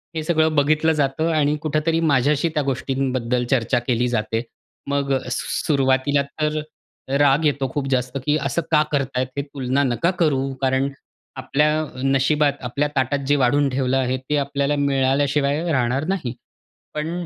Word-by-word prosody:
हे 155 - -2
सगळं 160 -1 +2
बघितलं 155 +2 +3
जातं 145 +1 0
आणि 150 -1 +2
कुठेतरी 155 +2 0
माझ्याशी 145 +4 +2
त्या 150 -2 0
गोष्टींबद्दल 130 -2 -1
चर्चा 125 -1 +2
केली 125 0 +1
जाते. 115 -1 -1 0.5
मग 140 -1 0 0.2
सुरुवातीला 140 0 +1 0.2
तर 155 0 0 0.6
राग 145 +2 +4
येतो 140 -2 +1
खूप 140 -2 -2
जास्त, 125 0 -1
की 150 +1 +2
असं 145 +4 -1
का 150 - +5
करत 140 -3 +1
आहेत 130 0 0
हे? - - +1
तुलना 140 -1 -1
नका 135 +8 +1
करू, 150 -6 +2 0.2
कारण 130 +1 +1 0.5
आपल्या 150 +2 +1 0.2
नशिबात, 140 +2 +2
आपल्या 140 +4 -1
ताटात, 135 +2 +1
जे 145 - +4
वाढून 140 +2 +2
ठेवलं 130 0 0
आहे, 130 0 0
ते 130 +3 -2
आपल्याला 140 +1 0
मिळाल्याशिवाय 140 +1 +1
राहणार 130 +1 0
नाही. 165 -11 -2 0.6
पण, 165 +3 -3
140 Hz, 150 wpm, -22 LUFS, 130-150 Hz, 0.6 s, का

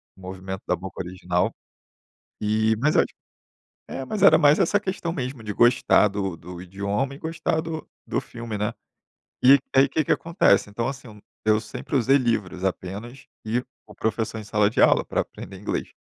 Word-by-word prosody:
o 95 - -18
movimento 95 +1 -6
da 90 - +2
boca 95 +1 -7
original. 90 0 -1 0.9
E, 110 +1 +2
mas 150 +4 +2
eu - - +7
acho - - -4 0.8
é, 135 - -5
mas 205 +8 -4
era 160 -5 +8
mais 150 0 +5
essa 195 +2 +3
questão 185 -4 -3
mesmo, 130 -3 -4
de 105 -1 -4
gostar 120 -3 +4
do 95 -3 -3
do 90 +2 -10
idioma 100 +8 -2
e - - -11
gostar 160 0 -1
do 160 -1 -6 0.2
do - - -1
filme, 115 -3 -7
né. 105 0 -1 0.7
E, 140 +2 +9 0.2
aí 135 +1 +6
que 155 - +1
que - - +2
acontece, 165 - +2
então 115 +4 -2
assim, 135 -1 -6
eu 105 -1 -13 0.2
eu 110 0 +3
sempre 110 +5 -5
usei 135 +3 +4
livros 105 -8 -1
apenas, 100 +7 -4 0.2
e 115 +3 0 0.3
o 105 - -15
professor 110 0 -2
em 105 - -7
sala 105 0 +2
de - - 0
aula, - - +5
pra - - 0
aprender - - -10
inglês. - - -3
110 Hz, 185 wpm, -24 LUFS, 100-140 Hz, 0.9 s, E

